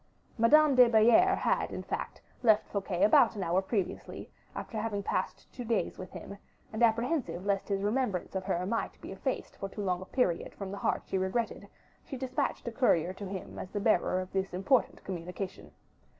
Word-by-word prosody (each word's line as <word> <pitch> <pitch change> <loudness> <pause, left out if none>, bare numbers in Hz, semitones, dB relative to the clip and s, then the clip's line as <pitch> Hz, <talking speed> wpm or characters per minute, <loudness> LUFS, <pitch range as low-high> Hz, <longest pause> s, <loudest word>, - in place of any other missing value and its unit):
Madame 290 +6 +5
de 250 -2 +7
Belliere 240 - +5
had, - - 0
in - - -5
fact, - - -5 0.2
left 220 -3 +4
Fouquet 195 -2 -1
about 210 +2 +5
an 200 - -3
hour 175 +2 +2
previously, 195 -2 -4 0.2
after 220 - -5
having 210 -2 -2
passed - - -2
two 245 - -6
days 230 -2 -1
with 185 - -7
him; 200 - -9 0.3
and 220 - -3
apprehensive 235 - +1
lest 200 -1 0
his 195 -1 0
remembrance 210 -4 -1
of 190 -1 -2
her 180 -2 -1
might 230 +4 -2
be - - -9
effaced - - -4
for 195 - -5
too 205 +1 -5
long 180 -2 0
a - - -7
period 185 -6 -1
from 195 -1 -6
the 200 - -5
heart - - 0
she 190 - -1
regretted, 200 +5 -2 0.4
she 270 - -7
dispatched 255 -1 -2
a - - -1
courier 185 - +2
to 200 +1 -7
him 190 -1 -7
as 185 - -6
the 205 - -3
bearer 190 -3 +2
of 185 0 -6
this 190 -1 -1
important 225 +7 +1
communication. 180 +1 -6
200 Hz, 195 wpm, -30 LUFS, 185-235 Hz, 0.4 s, de